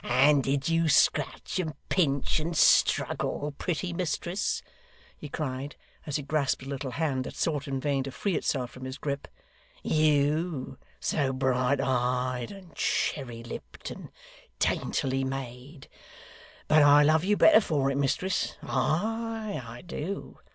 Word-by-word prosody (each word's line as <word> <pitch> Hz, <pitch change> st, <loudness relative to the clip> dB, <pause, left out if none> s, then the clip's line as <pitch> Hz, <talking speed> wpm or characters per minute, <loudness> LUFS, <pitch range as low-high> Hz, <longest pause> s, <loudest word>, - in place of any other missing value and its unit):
and 140 Hz, +3 st, +4 dB
did 135 Hz, 0 st, 0 dB
you 165 Hz, -1 st, +2 dB
scratch, 150 Hz, -, +2 dB
and 160 Hz, -5 st, -2 dB
pinch, 140 Hz, -5 st, +1 dB
and 165 Hz, +1 st, -3 dB
struggle, 145 Hz, 0 st, +3 dB
pretty 175 Hz, +1 st, -2 dB
mistress?' 175 Hz, +2 st, -2 dB, 0.5 s
he 150 Hz, -, -9 dB
cried, 140 Hz, -1 st, -4 dB, 0.3 s
as 145 Hz, -, -3 dB
he 145 Hz, -, -1 dB
grasped 140 Hz, -2 st, 0 dB
a -, -, -9 dB
little 140 Hz, 0 st, -4 dB
hand 130 Hz, 0 st, -1 dB
that -, -, -8 dB
sought 150 Hz, -3 st, -1 dB
in 135 Hz, -1 st, -2 dB
vain 140 Hz, 0 st, 0 dB
to 135 Hz, -, -5 dB
free 190 Hz, +7 st, -2 dB
itself 125 Hz, -5 st, -1 dB
from 130 Hz, 0 st, -9 dB
his 130 Hz, +1 st, -6 dB
grip: 140 Hz, -1 st, -4 dB, 0.6 s
'you, 155 Hz, 0 st, +1 dB, 0.2 s
so 140 Hz, -4 st, 0 dB
bright 130 Hz, 0 st, +1 dB
eyed, 125 Hz, -1 st, 0 dB
and 190 Hz, -5 st, -12 dB
cherry 120 Hz, -5 st, -1 dB
lipped, 115 Hz, -, -8 dB
and -, -, -9 dB, 0.5 s
daintily 135 Hz, 0 st, 0 dB
made? 135 Hz, +2 st, -6 dB, 0.8 s
But 155 Hz, 0 st, +6 dB
I 145 Hz, 0 st, +7 dB
love 155 Hz, +2 st, +4 dB
you 205 Hz, +2 st, +2 dB
better 220 Hz, -, +7 dB
for 140 Hz, -8 st, 0 dB
it, -, -, -2 dB
mistress. 140 Hz, +7 st, 0 dB
Ay, 220 Hz, +2 st, -1 dB
I 115 Hz, +1 st, -10 dB
do. 175 Hz, +2 st, -6 dB
145 Hz, 145 wpm, -28 LUFS, 130-160 Hz, 0.8 s, I